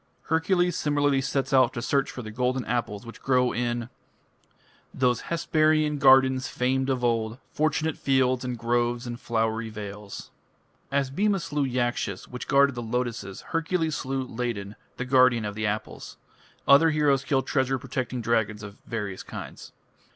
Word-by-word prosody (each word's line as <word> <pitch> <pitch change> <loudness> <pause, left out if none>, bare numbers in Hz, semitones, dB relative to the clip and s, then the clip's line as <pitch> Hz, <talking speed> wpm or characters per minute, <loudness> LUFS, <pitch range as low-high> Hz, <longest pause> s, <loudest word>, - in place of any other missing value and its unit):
" - - -41
Hercules 175 +2 +2
similarly 145 -2 +1
sets 135 0 -1
out 130 -1 +5
to 120 - -4
search 140 +1 +1
for 125 - -7
the 110 - -7
golden 125 +2 -1
apples 115 -3 -2
which 115 - -11
grow 125 -2 +2
in 120 0 -2 1.0
those 125 -2 +1
Hesperian 155 -2 +2
gardens 130 -1 +5
famed 130 +2 0
of 130 -2 -1
old, 115 -1 0
Fortunate 155 +1 0
fields, 130 -2 +2
and 125 -1 -3
groves 120 +1 0
and 120 0 -6
flowery 115 0 -1
vales. 105 -1 -8 0.6
As 140 -1 0
Bhima 200 +6 +1
slew 150 -3 -2
Yakshas 120 -6 -2
which 125 - -7
guarded 140 0 +4
the 120 - -5
lotuses, 120 -4 -3
Hercules 165 -1 0
slew 135 0 -2
Ladon, 115 -4 -4 0.2
the 125 - -3
guardian 125 -3 +4
of 105 - -3
the 110 +1 -2
apples. 105 +1 -5 0.5
Other 145 +4 +7
heroes 145 -3 +2
kill 135 -1 +1
treasure 130 0 0
protecting 125 0 -4
dragons 110 -2 0
of 100 0 -10
various 105 -5 -4
kinds. - - -9
125 Hz, 155 wpm, -26 LUFS, 115-140 Hz, 1.0 s, Other